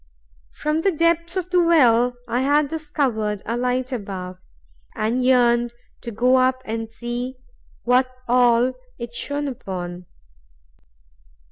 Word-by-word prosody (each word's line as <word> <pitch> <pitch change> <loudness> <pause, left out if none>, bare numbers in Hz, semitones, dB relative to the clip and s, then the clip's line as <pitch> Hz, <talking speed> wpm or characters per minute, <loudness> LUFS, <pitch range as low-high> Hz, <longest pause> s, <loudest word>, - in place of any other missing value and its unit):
From 305 +1 -1
the 390 - +2
depths 335 +1 +1
of 365 -1 -3
the 360 -1 +4
well 250 -8 +4
I 245 - 0
had 290 +1 +2
discovered 265 -10 -2
a 230 - -2
light 250 +1 -1
above, 190 -6 -5 0.6
and 235 +4 0
yearned 240 -2 +3 0.3
to 235 - -6
go 245 +4 +3
up 255 0 +2
and 225 0 -4
see 240 +2 -5 0.5
what 250 +1 +3 0.2
all 245 0 +4 0.2
it 235 -1 -7
shone 285 +4 -2
upon. 180 -8 -6
250 Hz, 125 wpm, -22 LUFS, 230-285 Hz, 0.6 s, the